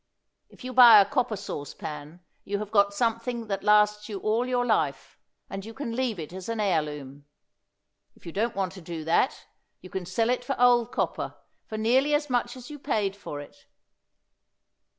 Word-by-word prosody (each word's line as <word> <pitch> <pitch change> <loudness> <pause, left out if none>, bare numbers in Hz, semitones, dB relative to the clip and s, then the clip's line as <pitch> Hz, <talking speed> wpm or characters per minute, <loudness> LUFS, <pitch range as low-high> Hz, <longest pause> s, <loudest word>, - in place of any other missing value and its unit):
If - - -16
you 255 0 -5
buy 240 -4 +10
a 200 - +6
copper 250 0 0
sauce 145 -7 -6
pan 150 +3 -8 0.2
you 200 +1 -2
have 210 0 -6
got 200 -2 +4
something 230 +2 -1
that 195 -1 -2
lasts 210 0 +3
you 205 - -4
all 225 +5 0
your 245 -1 +1
life, 220 -3 -1 0.3
and 195 0 -6
you 225 +2 -10
can 250 -5 -4
leave 245 -4 -1
it 160 0 -7
as 190 +3 -7
an 230 -1 -2
heirloom; 150 -7 -2 0.9
if - - -22
you 170 - -6
don't 225 +6 -1
want 190 -2 -1
to 190 0 -11
do 165 -1 -6
that, 170 - +1 0.3
you 185 - -13
can 185 -2 -4
sell 230 +4 +1
it 250 0 -1
for 270 +1 -3
old 245 -1 +4
copper - - -2 0.3
for 215 - -5
nearly 260 +7 +3
as 295 -2 -2
much 245 0 0
as 255 +4 -10
you 295 - -8
paid 210 -8 -1
for 145 -7 -7
it. 145 - -15
215 Hz, 190 wpm, -27 LUFS, 190-245 Hz, 0.9 s, buy